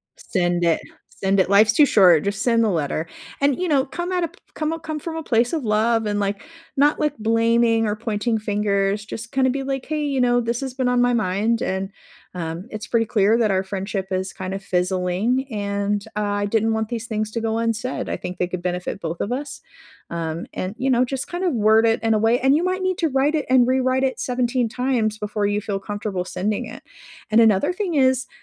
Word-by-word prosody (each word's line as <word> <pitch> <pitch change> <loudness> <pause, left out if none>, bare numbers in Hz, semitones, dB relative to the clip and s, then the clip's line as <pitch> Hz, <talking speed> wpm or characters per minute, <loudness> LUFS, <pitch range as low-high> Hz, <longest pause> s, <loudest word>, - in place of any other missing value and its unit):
Send 175 -3 -1
it. 165 -1 +2 0.3
Send 195 0 0
it, 185 - +2
life's 215 +2 +5
too 290 +2 +5
short, 180 -7 +5
just 200 +2 -1
send 230 -2 +3
the 220 - +2
letter, 160 -2 -1 0.3
and, 280 +1 +2
you 365 - 0
know, 280 -4 +2
come 345 +6 -5
at 360 -1 0
a - - +1
p - - -22 0.2
come 310 0 -2
a 330 - -4
come 310 -1 -5
from 325 +2 -6
a 320 - -4
place 235 -2 +2
of 320 -4 -2
love 225 +1 +2
and 205 -1 -1
like, 200 0 -2 0.3
not, 290 +2 +3
like, 300 -1 0
blaming 230 0 +2
or 210 - 0
pointing 220 +1 -1
fingers, 205 -1 0
just 225 +2 -7
kinda 260 -1 +2
be 270 +1 -2
like, 270 -1 -3
"Hey, 305 -1 -1
you 275 -3 0
know, 245 0 +3
this 235 +2 -2
has 265 -2 -5
been 260 -2 0
on 250 0 +2
my 245 0 +3
mind, 220 +2 0
and 190 0 -2 0.5
um, 170 +3 -5
it's 215 -2 -6
pretty 225 -1 +1
clear 210 +1 +3
that 220 -3 +2
our 190 -1 +1
friendship 195 0 -4
is 190 +1 -1
kinda 190 0 -5
fizzling 185 +8 0
and, 200 -1 -2
uh, 210 - -1
I 205 0 -1
didn't 225 +1 +1
want 220 -1 -2
these 230 -1 -4
things 215 -1 -2
to 230 - -3
go 225 0 -1
unsaid. 230 +2 -2
I - - -1
think 180 0 -6
they 180 - +1
could 180 -1 -5
benefit 180 +2 -3
both 165 0 -4
of 210 - -2
us." 280 +3 -4 0.5
Um, 165 0 -3
and, 185 +3 -4
you 265 +1 0
know, 250 0 +4
just 265 +2 -3
kind 350 +2 -4
of 360 - +1
word 220 +1 +4
it 225 - +2
in 225 0 +3
a 215 - +2
way 225 +3 +3
and 265 +2 +4
you 320 - +1
might 370 +1 -1
need 370 -1 -1
to 325 -3 +1
write 275 +3 +2
it 300 -3 -1
and 255 -2 +5
rewrite 260 0 +1
it 265 -1 -1
17 245 -1 0
times 235 -3 0
before 210 -1 -2
you 205 +1 0
feel 195 -1 -3
comfortable 205 -2 -4
sending 200 +3 -2
it, - - -10 0.5
and 220 +2 +6
another 220 - +3
thing 370 -5 -2
is, 260 -1 +3
225 Hz, 230 wpm, -22 LUFS, 200-260 Hz, 0.5 s, and